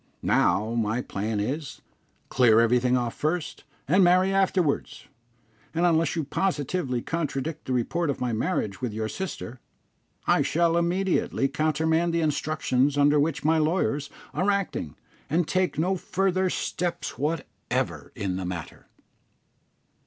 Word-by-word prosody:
Now, 110 +3 +2
my 115 +1 0
plan 105 +2 -3
is, 135 +8 -4 0.5
clear 115 -3 +5
everything 125 +2 +3
off 120 -2 -1
first, 160 +2 -3 0.2
and 185 +7 +5
marry 185 +2 +4
afterwards; 185 -6 0 0.7
and 170 +2 +2
unless 165 -3 +2
you 165 - -1
positively 145 -5 -1
contradict 155 -1 -3
the 130 - -2
report 155 +7 0
of 140 - -2
my 125 -2 -1
marriage 110 - -1
with 125 -4 -2
your 110 0 -2
sister, 130 -5 -6 0.7
I - - +3
shall 165 +2 +2
immediately 170 -4 +1
countermand 160 +3 +1
the 170 - +2
instructions 145 -3 +1
under 145 +1 +4
which 150 0 0
my 160 +1 +4
lawyers 155 -3 0 0.2
are 190 +3 +1
acting, 195 - -1 0.3
and 160 +2 +1
take 185 -6 0
no 180 +5 +1
further 185 +1 0
steps 175 -1 -3
whatever 150 +2 -3
in 95 -2 -2
the 95 - -4
matter." 85 -5 -7
155 Hz, 135 wpm, -26 LUFS, 125-175 Hz, 0.7 s, clear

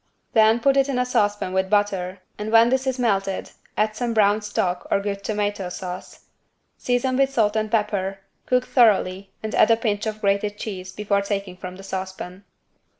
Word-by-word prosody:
Then 220 +1 +5
put 275 +2 +3
it 275 0 +3
in 265 - -1
a 250 - +2
saucepan 205 -5 0
with 190 0 0
butter, 195 -3 0 0.2
and 210 +1 -4
when 230 +1 +6
this 265 +1 0
is 260 -1 0
melted, 195 -5 -1 0.3
add 215 0 +1
some 235 0 -2
brown 210 0 +4
stock 185 -3 -2
or - - +2
good 200 0 -4
tomato 205 -3 -2
sauce. 180 0 -7 0.5
Season 250 +1 0
with 270 0 +3
salt 220 -5 +2
and 215 0 0
pepper, 195 -3 -1 0.3
cook 250 0 +2
thoroughly 200 -6 +3
and 220 - -4
add 215 - +5
a 230 - +5
pinch 215 -1 -1
of 215 0 -4
grated 205 0 0
cheese 185 -4 -6
before 200 0 0
taking 200 -2 -3
from 180 0 -8
the 195 - -11
saucepan. 190 0 -6
205 Hz, 185 wpm, -23 LUFS, 195-225 Hz, 0.5 s, when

